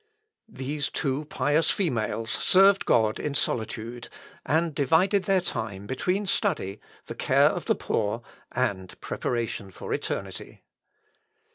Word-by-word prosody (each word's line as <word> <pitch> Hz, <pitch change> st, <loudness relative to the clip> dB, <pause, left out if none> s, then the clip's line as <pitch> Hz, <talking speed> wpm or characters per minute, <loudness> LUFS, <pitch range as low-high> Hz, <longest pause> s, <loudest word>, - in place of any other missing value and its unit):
These 145 Hz, -4 st, -3 dB
two 140 Hz, +2 st, -2 dB
pious 150 Hz, +2 st, +1 dB
females 115 Hz, -, -1 dB
served 195 Hz, +1 st, +5 dB
God 110 Hz, -2 st, +3 dB
in 145 Hz, -1 st, -3 dB
solitude, 115 Hz, -1 st, -2 dB, 0.3 s
and 160 Hz, +3 st, +1 dB
divided 170 Hz, +8 st, +3 dB
their 195 Hz, -2 st, +3 dB
time 100 Hz, -, -3 dB
between 180 Hz, -, -1 dB
study, 160 Hz, -, 0 dB, 0.3 s
the -, -, -6 dB
care -, -, +4 dB
of -, -, -4 dB
the -, -, +2 dB
poor, 110 Hz, +2 st, -1 dB, 0.3 s
and 100 Hz, -7 st, -2 dB
preparation 115 Hz, -4 st, -3 dB
for 95 Hz, -, -6 dB
eternity. -, -, -5 dB
130 Hz, 120 wpm, -26 LUFS, 110-170 Hz, 0.3 s, served